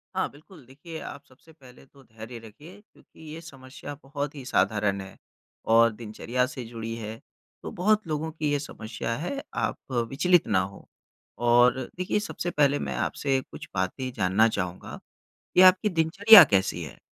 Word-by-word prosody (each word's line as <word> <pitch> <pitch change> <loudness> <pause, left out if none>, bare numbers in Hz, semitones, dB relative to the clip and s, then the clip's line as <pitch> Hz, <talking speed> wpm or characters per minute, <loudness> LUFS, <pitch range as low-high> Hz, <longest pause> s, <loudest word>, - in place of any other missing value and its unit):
हाँ, - - 0
बिल्कुल 155 0 -17
देखिए 145 +6 -10
आप 140 - -9
सबसे 135 +4 -21
पहले 130 -4 -17
तो 135 0 -21
धैर्य 110 0 -10
रखिए 150 - -14
क्योंकि 210 - -25
ये 165 - -8
समस्या 140 -2 -10
बहुत 140 +1 -5
ही 140 - -8
साधारण 100 -3 0
है 95 0 -12 0.6
और 115 0 +6
दिनचर्या 115 +3 -3
से 130 -2 -7
जुड़ी 115 0 -6
है, 110 -1 -7 0.5
तो - - -6
बहुत 210 +2 +1
लोगों 155 +1 -3
की 155 -2 -2
ये 145 - +1
समस्या 115 -4 -5
है 275 - -4
आप - - -1 0.3
विचलित 175 +5 +2
ना 95 - +2
हों। 95 +2 -5 0.6
और 120 +2 +5 0.2
देखिए, 185 +3 -1
सबसे 190 -4 -4
पहले 145 -2 +2
मैं - - -4
आपसे 135 -2 -1
कुछ - - -9
बातें 95 +8 -2
जानना 95 +4 +3
चाहूँगा, 90 -5 -5 0.6
कि - - +7
आपकी 185 +3 +6
दिनचर्या 190 +5 +8
कैसी 95 - 0
है? 75 - -10
135 Hz, 165 wpm, -26 LUFS, 110-160 Hz, 0.6 s, दिनचर्या